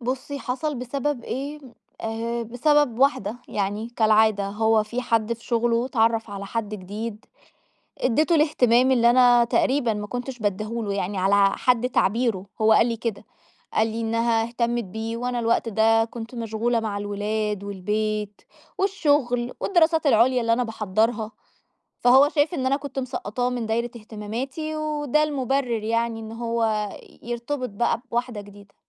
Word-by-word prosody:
بُصِي، 260 +3 -4
حصل 275 +4 -3
بسبب 255 0 -3
إيه؟ 280 +4 -4 0.4
آآ 230 +1 -3
بسبب 250 +2 +2
واحدة، 260 -5 +2
يعني 205 +3 -2
كالعادة 215 -2 +3
هو 220 +1 +2
في 235 +4 -4
حد 230 -2 +1
في 230 0 -8
شغله، 235 0 +1
اتعَرّف 225 -3 +1
على 200 0 -6
حد 215 0 -3
جديد، 210 +3 -6 0.7
ادِّتُه 305 +7 +2
الاهتمام 260 -5 +3
اللي 235 -1 +5
أنا 245 -1 +6
تقريبًا 245 0 +1
ما 210 0 -4
كُنتش 245 +2 -5
بَادّيه 210 -1 -1 0.2
له 205 -2 -2
يعني 195 0 -2
على 195 +1 +4
حد 250 -1 +2
تعبيره، 220 -3 +1 0.2
هوَّ 220 0 +5
قَال 225 - +5
لي 230 -1 -1
كدا. 225 -3 -4 0.5
قال 220 +1 +3
لي 225 +1 -4
إنّها 230 0 +1
اهَتمّت 235 0 -1
بِيه، 220 +4 -5
وأنا 245 0 -2
الوقت 230 0 +1
دا 225 +1 +3
كُنت 230 +1 -8
مَشغُولة 230 0 -1
مع 210 -2 -3
الولاد، 205 0 -2
والبيت، 210 +1 -2 0.4
والشغل، 290 -11 +1
والدراسات 325 -4 +2
العُليا 250 +1 +4
اللي 230 0 +1
أنا 250 +1 0
باحَضَّرها. 220 +1 -1 0.7
فهو 265 +4 +6
شَايف 300 +3 +1
إن 260 -5 -2
أنا 270 +1 +2
كُنت 280 -1 -7
مسَقّطاه 250 -1 -2
مِن 245 -2 -3
دايرة 235 +2 -1
اهتماماتي، 235 +8 -5
وده 305 -1 0
المُبرر 270 -5 -1
يعني 230 0 -1
إن 220 0 -8
هوَّ 225 -3 -1 0.3
يرتبط 240 +3 -3
بقى 230 +3 0
بواحدة 240 -2 -2
جديدة. 205 0 -15
230 Hz, 150 wpm, -24 LUFS, 215-250 Hz, 0.7 s, أنا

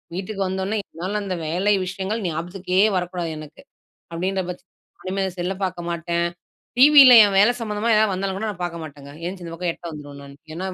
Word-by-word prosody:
வீட்டுக்கு 195 +2 -5
வந்தோன்னே, 190 +3 -2
என்னால 185 +5 -4
அந்த 190 -2 -3
வேலை 185 +6 +1
விஷயங்கள் 195 +4 -3
ஞாபகத்துக்கே 175 +3 -3 0.2
வரக்கூடாது 180 -1 -2
எனக்கு 155 0 -11 0.5
,அப்பிடின்ற 190 +3 -1
பட்சத் 180 +1 -10 0.4
இனிமே 195 0 -1
செல் 175 +1 -2
ல - - -2
பார்க்க 180 -2 -4
மாட்டேன், 170 0 -1 0.5
டிவியில 275 -2 +9
என் 200 -1 +1
வேல 210 +5 +6
சம்மந்தமா 220 +1 -1
எதாவது 215 -1 +3
வந்தாலும் 190 0 -3
கூட 220 - -3
நான் 185 -3 -7
பார்க்க 170 -1 -5
மாட்டேங்க. 140 -2 -11
எந்திரிச்சு 180 +1 -5
இந்த 165 - -7
பக்கம் 170 0 -2
எட்ட - - -20
வந்துருவேன் 145 -2 -10
நானு. 140 0 -13 0.2
ஏன்னா 185 +3 -4
185 Hz, 185 wpm, -22 LUFS, 170-195 Hz, 0.5 s, டிவியில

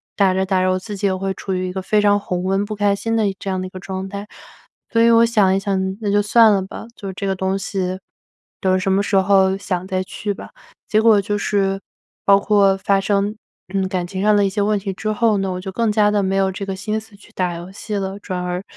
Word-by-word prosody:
打 195 -2 +3
着 190 0 0
打 190 -1 +1
着 185 - +2
我 185 - 0
自 205 +2 -7
己 200 +1 0
也 190 - +1
会 190 0 -2
处 190 - -5
于 185 0 -1
一 180 - -5
个 190 - -3
非 210 +3 +1
常 205 0 +4
红 180 -2 -3
温、 195 +1 +1
不 215 +1 -5
开 205 -1 +2
心 225 +2 -1
的 220 - +2
这 195 - -6
样 185 -1 -1
的 185 - -4
一 - - -10
个 185 - -9
状 190 0 -5
态。 200 +1 -7 0.6
所 230 - +2
以 230 - +6
我 230 0 +6
想 205 -5 +3
一 - - +1
想， 190 -1 -1
那 205 -2 -1
就 205 - +3
算 220 +1 +5
了 195 -2 +2
吧 195 +4 -9
就 195 -2 -7
这 195 +1 -4
个 190 - 0
东 190 +1 -1
西， 185 -1 -3 0.6
等 185 0 +2
什 190 +1 0
么 195 +1 +2
时 200 - -1
候 190 0 +4
想， 185 -2 -3
再 185 -1 -1
去 205 +2 -4
吧。 - - -10 0.4
结 215 - +2
果 220 -2 +5
就 205 +1 -2
是 195 -1 0 0.5
包 200 0 +6
括 200 -2 +3
发 195 0 +1
生， 200 +1 0 0.4
嗯， 195 -1 0
感 185 -2 -2
情 190 +1 -5
上 210 0 +4
的 205 - +4
一 - - +1
些 205 +1 -1
问 210 0 +1
题 195 0 -4
之 215 +3 -3
后 220 -1 +2
呢， 195 -1 -1
我 180 0 -4
就 190 0 -6
更 230 +2 0
加 210 -1 +3
地 205 -1 +1
没 190 0 0
有 195 0 +2
这 195 +1 -5
个 195 - -4
心 215 +3 -2
思 220 -1 -16
去 200 - -19
打 180 -2 -1
游 175 +2 -8
戏 210 +2 -7
了。 195 0 -3
转 185 -3 -4
而 180 +1 -3
195 Hz, 290 characters per minute, -20 LUFS, 190-205 Hz, 0.6 s, 以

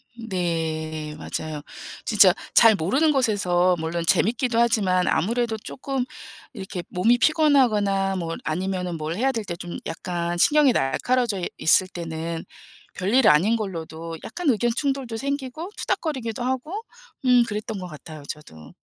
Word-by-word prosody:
음 230 -1 -9
네 160 -4 -2
맞아요. 155 -2 -5 0.4
진짜 200 -5 +6 0.2
잘 225 -2 +8
모르는 265 - +2
곳에서 185 -9 +2
물론 165 +1 -2
재미있기도 235 +2 +2
하지만 195 -6 +2
아무래도 225 +6 0
쪼끔 260 +3 -4 0.5
이렇게 190 -4 -6
몸이 230 +7 +2
피곤하거나 215 -12 +3
뭐 165 -2 -3
아니면 180 +1 -2
뭘 155 +2 -4
해야 265 +5 +1
될 225 -4 -3
때 170 - -4
좀 175 0 -7
약간 175 0 -3
신경이 295 +4 +5
날카로워져 225 - 0 0.2
있을 185 +3 +5
때는 165 -2 -5 0.5
별일 215 +7 +3
아닌 180 +10 +5
걸로도 165 -5 -5
약간 355 -5 -2
의견 240 0 +2
충돌도 270 -5 -2
생기고 280 - -4
투닥거리기도 245 -7 -2
하고 260 - -3 0.4
음 250 -1 +6
그랬던 210 0 -4
것 180 - -6
같아요, 155 -1 -10
저도. 80 - -9
195 Hz, 315 characters per minute, -24 LUFS, 170-245 Hz, 0.5 s, 잘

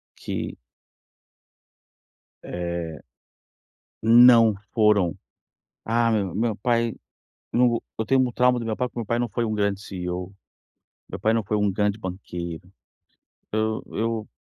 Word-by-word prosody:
que - - -5 1.9
é 85 -2 -4 1.0
não 115 -1 +7 0.2
foram, 105 -6 +3 0.7
"Ah, 115 +1 +2
meu 100 -6 0
meu 110 0 0
pai 115 +1 0 0.6
não 125 +1 +4
vou 120 -1 -2 0.2
eu 110 - 0
tenho 135 +3 +3
um 125 -2 0
trauma 125 +1 +3
do 115 - -5
meu 110 - -1
pai, 125 0 0
porque 120 - -8
meu 115 - -3
pai 115 - 0
não 120 -1 -1
foi 120 +2 -1
um 110 - -2
grande 100 -1 0
CEO, 90 -1 -5 0.8
meu - - -6
pai 110 +1 +2
não 115 -2 +1
foi 105 +2 -1
um 105 -1 +2
grande 105 +1 0
banqueiro, 90 -2 -6 0.8
eu 110 0 0
eu 115 -1 -2
110 Hz, 140 wpm, -24 LUFS, 95-115 Hz, 1.9 s, não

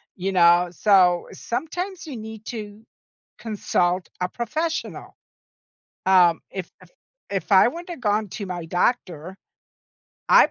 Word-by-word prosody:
you 190 +1 -2
know? 175 0 +5
So, 180 -2 +3
sometimes 350 +10 -4
you 295 -5 -7
need 220 -1 -9
to 215 -2 -8 0.5
consult 185 -5 -1
a 180 - 0
professional. 315 - -4 0.9
Um, 180 -3 +5
if 190 -3 -6
if - - -17 0.4
if 195 +1 -3
I 190 +2 +7
wouldn't 340 +7 -6
have 330 - -8
gone 210 -1 +1
to 200 +2 -6
my 175 -2 -5
doctor, 180 -1 -1 0.9
I - - +7
205 Hz, 125 wpm, -23 LUFS, 180-235 Hz, 0.9 s, I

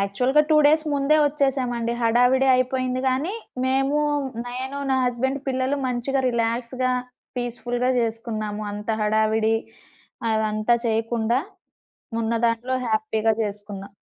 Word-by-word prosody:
యాక్చువల్‌గా 250 +9 +2
2 310 - +6
డేస్ 310 +1 +4
ముందే 280 +2 +3
వచ్చేసామండి. 260 -5 0
హడావిడి 245 +3 +4
అయిపోయింది 255 0 0
గానీ, 280 +9 0 0.3
మేము 270 +3 +1 0.5
నేను 260 +3 -4
నా 265 - +3
హస్బండ్ 265 +3 -1
పిల్లలు 260 +2 0
మంచిగా 255 +2 -1
రిలాక్స్‌గా 240 +2 -1 0.4
పీస్‌ఫుల్‌గా 245 +1 -1
చేసుకున్నాము. 220 -2 -3
అంత 210 +2 -4
హడావిడి 220 +1 +2 0.8
అదంతా 215 +2 +1
చేయకుండా, 230 +2 +1 0.8
ఉన్న 225 +1 -1
దాంట్లో 235 +3 -1
హ్యాపీగా 220 0 +1
చేసుకున్నా. 200 -1 -7
240 Hz, 105 wpm, -23 LUFS, 220-260 Hz, 0.8 s, 2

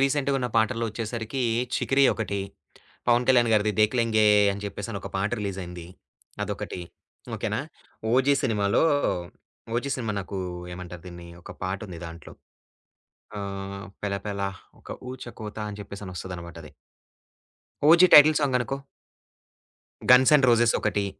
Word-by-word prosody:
రీసెంటుగున్న 135 -1 +1
పాటల్లో 115 +1 +2
వచ్చేసరికి 115 +3 -4 0.3
'చికిరి' 135 +1 +2
ఒకటి, 100 -2 -3 0.7
పవన్ 120 +1 +3
కళ్యాణ్ 120 -3 +5
గారిది 105 0 +3
'దేఖ్ 105 +4 +3
లెంగే' 110 -2 +3 0.3
అని 100 +1 -7
చెప్పేసి 100 +1 -5
ఒక - - -7
పాట 95 +2 0
రిలీజ్ 100 -2 -3
అయింది, 85 -1 -9 0.6
అదొకటి. 90 - -5 0.6
ఓకె - - -2
నా? - - -1 0.5
'ఓజి' 135 +2 +4
సినిమాలో, 105 -3 +2 0.9
'ఓజి' 140 +3 -1
సినిమా 115 -4 -3
నాకు 95 +1 -6 0.4
ఏమంటారు 90 -1 -9
దీన్ని, 85 0 -10
ఒక - - -11
పాటుంది 95 -2 -5
దాంట్లో. 85 -1 -11 1.0
ఆహ్, 100 -1 -6 0.2
'పెలపల 100 0 -3 0.4
ఒక - - -12 0.2
ఊచకోత' 110 -4 -7
అని 105 - -8
చెప్పేసనొస్తదనమాటది. 90 -5 -8 1.1
'ఓజి' 170 +4 +7
టైటిల్ 150 +1 +9
సాంగ్ 135 -3 +2
అనుకో. 135 +2 -2 1.3
'గన్స్ 130 +3 +7
అండ్ 135 -3 +3
రోజెస్' 120 -1 +4
ఒకటి, 105 -1 0
105 Hz, 120 wpm, -26 LUFS, 100-125 Hz, 1.3 s, టైటిల్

